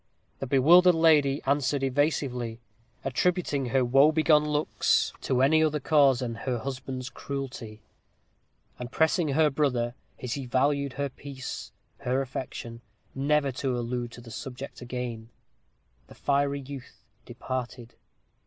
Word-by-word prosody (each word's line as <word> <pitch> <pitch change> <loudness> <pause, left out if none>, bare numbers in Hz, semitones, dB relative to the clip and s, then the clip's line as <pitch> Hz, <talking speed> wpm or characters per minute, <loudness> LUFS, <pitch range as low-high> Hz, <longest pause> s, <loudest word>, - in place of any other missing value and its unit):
The 135 - -4
bewildered 170 +7 +6
lady 150 -4 +3
answered 140 0 +1
evasively, 130 -4 -1 0.5
attributing 145 0 0
her 130 +1 +2
woe 135 +5 +5
begone 155 -1 +4
looks 150 0 +1
to 130 0 +1
any 155 +3 +4
other 150 -1 +1
cause 140 -3 +4
than 120 -2 -3
her 125 +2 -3
husband's 130 +1 -5
cruelty; 130 -7 -7 1.0
and 125 0 -6
pressing 160 +2 +2
her 150 +1 +3
brother, 125 -5 0 0.3
as 125 -2 -4
he 135 -2 -5
valued 140 +2 +1
her 140 -1 -2
peace, 135 0 -8 0.3
her 130 -1 0
affection, 120 -3 -7 0.3
never 140 0 +1
to 130 0 -2
allude 120 0 -3
to 120 - -10
the 115 -1 -12
subject 130 +3 -8
again. 120 -2 -5 0.8
The - - -15
fiery 140 0 0
youth 135 -1 -11 0.2
departed. 125 -2 -6
135 Hz, 130 wpm, -27 LUFS, 125-145 Hz, 1.0 s, bewildered